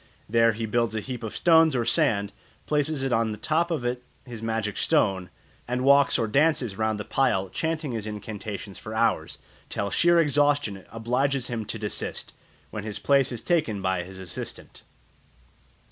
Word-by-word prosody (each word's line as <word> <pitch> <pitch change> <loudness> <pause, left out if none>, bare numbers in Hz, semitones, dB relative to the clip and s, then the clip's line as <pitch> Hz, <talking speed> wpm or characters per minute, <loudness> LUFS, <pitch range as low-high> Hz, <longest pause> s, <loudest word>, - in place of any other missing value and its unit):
There 115 +1 +4
he 115 +1 -3
builds 115 +1 0
a - - 0
heap 125 +2 -6
of 110 - -6
stones 160 -3 +5
or 120 -2 0
sand, 110 -8 +2 0.3
places 150 -2 0
on 115 -1 +1
the 105 - -5
top 160 - +1
of 155 -8 -2
it 125 0 -1 0.2
his 120 -4 -8
magic 110 -2 -2
stone, 95 - +1 0.4
and 125 +1 -1
walks 140 +1 +5
or 115 - 0
dances 135 -4 +2
round 110 0 -1
the 105 - -5
pile 95 -8 +1
chanting 160 - -2
his 110 -2 -4
incantations 105 -1 -6
for 110 0 -7
hours, - - 0 0.3
till 100 -1 -2
sheer 175 0 +4
exhaustion 145 - +2
obliges 125 +3 0
him 115 -3 -3
to 110 - -4
desist, 105 -1 -3 0.4
when 105 - -5
his 105 -1 -4
place 135 -2 +3
is 120 -2 -5
taken 155 - +1
by 95 -1 0
his 95 +2 -10
assistant. 95 -3 -7
115 Hz, 170 wpm, -26 LUFS, 105-140 Hz, 0.4 s, stones